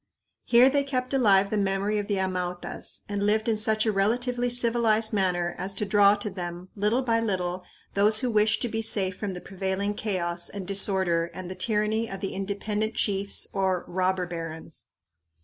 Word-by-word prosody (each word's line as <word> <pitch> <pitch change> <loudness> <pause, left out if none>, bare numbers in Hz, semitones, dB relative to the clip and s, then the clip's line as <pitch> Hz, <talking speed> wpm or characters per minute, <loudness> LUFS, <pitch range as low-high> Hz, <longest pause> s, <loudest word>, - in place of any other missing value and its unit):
Here 240 +2 +6
they 280 +1 +2
kept 255 -1 -3
alive 200 -7 +4
the 215 - 0
memory 200 +2 0
of 205 - -4
the 205 - 0
Amautas 180 -2 -4
and 205 -1 -2
lived 215 +2 +1
in 225 - +2
such 215 0 +2
a 220 - +2
relatively 245 +5 0
civilized 230 -2 +2
manner 180 -3 0
as 195 +1 -2
to 210 - -1
draw 205 0 +5
to 205 +1 -4
them, 175 0 -6
little 215 +5 +1
by 230 -2 +2
little, 185 -5 -2 0.3
those 210 +3 +3
who 250 -2 0
wished 215 0 +2
to - - 0
be 225 -1 -2
safe 195 -4 +1
from 195 -2 -4
the 180 - -7
prevailing 195 +1 -2
chaos 175 -5 -2
and 200 -2 -7
disorder 190 -3 +1
and 185 -1 -7
the - - -3
tyranny 215 +3 0
of 195 - -6
the 195 - -4
independent 205 +3 -2
chiefs 200 -1 0
or 190 -2 0
"robber 185 0 0
barons." 165 -2 -7
200 Hz, 185 wpm, -26 LUFS, 185-220 Hz, 0.3 s, Here